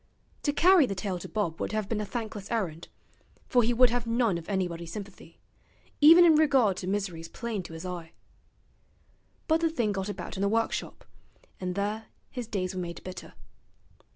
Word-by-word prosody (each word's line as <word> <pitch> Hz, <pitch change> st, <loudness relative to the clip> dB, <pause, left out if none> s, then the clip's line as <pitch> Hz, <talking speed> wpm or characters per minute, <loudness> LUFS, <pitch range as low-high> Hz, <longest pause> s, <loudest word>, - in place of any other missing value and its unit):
To 290 Hz, -, +1 dB
carry 350 Hz, -1 st, +5 dB
the 195 Hz, -, -3 dB
tale 185 Hz, -1 st, -3 dB
to -, -, -8 dB
Bob 185 Hz, -7 st, -2 dB
would -, -, -2 dB
have 215 Hz, -2 st, -1 dB
been 210 Hz, 0 st, -1 dB
a -, -, -3 dB
thankless 215 Hz, -4 st, -5 dB
errand, 175 Hz, -8 st, -2 dB, 0.6 s
for 245 Hz, -, +4 dB
he 235 Hz, +1 st, +2 dB
would 245 Hz, 0 st, +5 dB
have 240 Hz, -1 st, -2 dB
none 230 Hz, -6 st, +1 dB
of 165 Hz, -, -12 dB
anybody's 175 Hz, -4 st, -2 dB
sympathy, 195 Hz, -4 st, -9 dB, 0.6 s
even 330 Hz, +4 st, +9 dB
in 330 Hz, -, +7 dB
regard 270 Hz, -10 st, +4 dB
to 185 Hz, -, -5 dB
miseries 185 Hz, -5 st, -2 dB
plain 225 Hz, +1 st, -4 dB
to 170 Hz, -, -10 dB
his 160 Hz, +2 st, -7 dB
eye. 175 Hz, -2 st, -6 dB, 1.3 s
But 320 Hz, +1 st, +3 dB
the 330 Hz, -, +3 dB
thing 235 Hz, -10 st, 0 dB
got 195 Hz, 0 st, -3 dB
about 205 Hz, -, -6 dB
in -, -, -3 dB
the 200 Hz, -, +2 dB
workshop, 225 Hz, +1 st, -2 dB, 0.5 s
and 180 Hz, -1 st, -3 dB
there 210 Hz, +2 st, -2 dB, 0.2 s
his 245 Hz, -3 st, -5 dB
days 190 Hz, -4 st, -2 dB
were 185 Hz, -, -3 dB
made 170 Hz, -1 st, -6 dB
bitter. 185 Hz, 0 st, -8 dB
205 Hz, 185 wpm, -28 LUFS, 185-235 Hz, 1.3 s, even